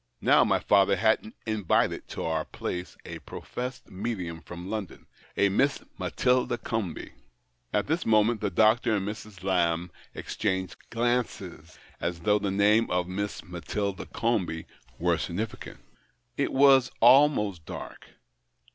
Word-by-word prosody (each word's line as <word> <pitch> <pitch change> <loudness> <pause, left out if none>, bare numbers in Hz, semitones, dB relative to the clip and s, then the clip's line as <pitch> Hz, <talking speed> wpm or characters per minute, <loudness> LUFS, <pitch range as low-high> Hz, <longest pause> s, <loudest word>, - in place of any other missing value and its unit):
Now, - - +5
my - - +2
father 100 -1 +4
had 110 0 +1
invited 110 -5 0
to - - -5
our 80 -1 0
place 90 +3 -6
a - - -7
professed 125 -2 -7
medium 95 -5 -4
from 90 +1 -9
London— 105 -2 -5 0.3
a 100 - +4
Miss 135 +8 +1 0.2
Matilda 125 -1 +1
Comby." 110 -8 -4 0.6
At 105 - +1
this 160 +4 0
moment 110 +1 +3
the 105 - 0
doctor 110 +4 +3
and 100 -1 -2
Mrs. 105 -3 -8
Lamb 85 -2 +1 0.2
exchanged 95 -2 -2
glances, 115 -9 -2 0.2
as 85 -1 -3
though 105 +3 +3
the 100 -1 -1
name 105 +3 +3
of 90 0 0
Miss 100 0 -4
Matilda 95 +3 -4
Comby 100 -9 -1 0.3
were - - +1
significant. 105 +6 -5 0.6
It - - 0
was 135 -2 +6
almost 115 - +5
dark. - - -8
105 Hz, 130 wpm, -27 LUFS, 90-115 Hz, 0.6 s, was